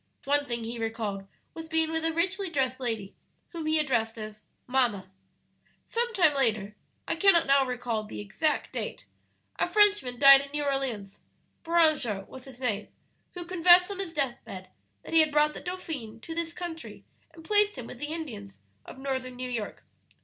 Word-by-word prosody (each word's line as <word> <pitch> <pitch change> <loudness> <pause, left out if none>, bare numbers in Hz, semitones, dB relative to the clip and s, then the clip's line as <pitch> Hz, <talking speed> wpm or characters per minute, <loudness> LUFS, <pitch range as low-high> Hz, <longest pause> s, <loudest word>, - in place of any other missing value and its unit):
One 285 +1 +1
thing 235 -1 -2
he 230 +1 -5
recalled 220 -3 -3 0.3
was 325 -1 -8
being 320 0 +1
with 320 0 -1
a 325 - +1
richly 380 +4 -1
dressed 265 -5 0
lady 225 -6 -3 0.4
whom 330 -3 -5
he 315 0 +2
addressed 235 -7 0
as 215 -1 -8 0.2
'mamma.' 235 -8 0 0.7
"Some 475 +1 -1
time 320 -6 +5
later 215 -6 0 0.3
I - - 0
cannot 345 -1 +5
now 275 0 +4
recall 245 -3 -2
the 215 - -8
exact 290 +10 -1
date - - -5 0.5
a - - +1
Frenchman 410 -12 +3
died 275 +1 +9
in 280 - -9
New 295 0 -1
Orleans 260 -8 -2 0.4
(Beranger 310 - +2
was 260 - -11
his 260 -2 -12
name), 215 -5 -1 0.5
who 350 -1 -6
confessed 360 +1 +5
on 390 - -6
his 380 -4 -3
death 275 -6 -2
bed 185 -1 -9 0.3
that - - -9
he 325 - +7
had 310 -1 +4
brought 300 +1 +3
the - - -8
dauphin 315 -11 -6
to 325 - -7
this 330 0 -2
country 335 -2 -8 0.3
and 325 - -14
placed 415 -3 +3
him 250 - -6
with 240 - -10
the 295 - -3
Indians 225 -12 -6 0.3
of - - -11
Northern 260 -2 -4
New 250 0 -5
York. 225 -4 -5
275 Hz, 180 wpm, -28 LUFS, 230-325 Hz, 0.7 s, died